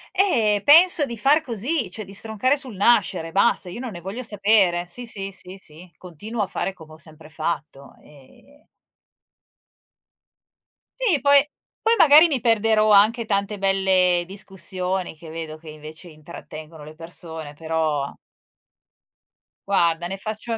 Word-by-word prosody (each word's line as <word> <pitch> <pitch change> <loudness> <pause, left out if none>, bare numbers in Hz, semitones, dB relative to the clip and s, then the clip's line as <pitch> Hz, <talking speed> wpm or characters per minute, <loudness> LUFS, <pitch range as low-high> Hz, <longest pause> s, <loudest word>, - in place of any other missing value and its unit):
E 220 - +2
penso 325 +1 +6
di 235 -4 -7
far 285 +8 +3
così, 245 - -3
cioè 215 +3 -6
di 195 - -13
stroncare 220 +7 0
sul 260 -6 -4
nascere, 190 -6 +1
basta. 200 -1 +1
Io 180 - -8
non 255 -2 -6
ne 175 -3 -9
voglio 205 +8 -6
sapere. 200 -5 +2
Sì, 245 +6 -6
sì, 195 -3 -4
sì, 185 0 -9
sì, 170 0 -13
continuo 205 +6 -7
a 200 - -1
fare 195 - -4
come 160 -3 -15
ho - - -14
sempre 155 0 -13
fatto, 155 -3 -5
ehm 150 - -21 2.3
Sì 370 - +1
poi 285 0 +5 0.4
poi 455 +1 +2
magari 310 -1 +7
mi 275 -6 -2
perderò 220 -1 +2
anche 215 +4 +4
tante 200 0 -2
belle 190 -2 +1
discussioni, 190 -2 -4
che 165 0 -13
vedo 160 -1 -7
che 155 0 -13
invece 155 +3 -11
intrattengono 155 0 -12
le 155 +1 -11
persone, 160 -2 -7
però 155 -2 -2 1.5
guarda 175 -3 +1
ne 195 +2 -6
faccio 215 +3 -5
a - - -2
195 Hz, 145 wpm, -22 LUFS, 165-230 Hz, 2.3 s, magari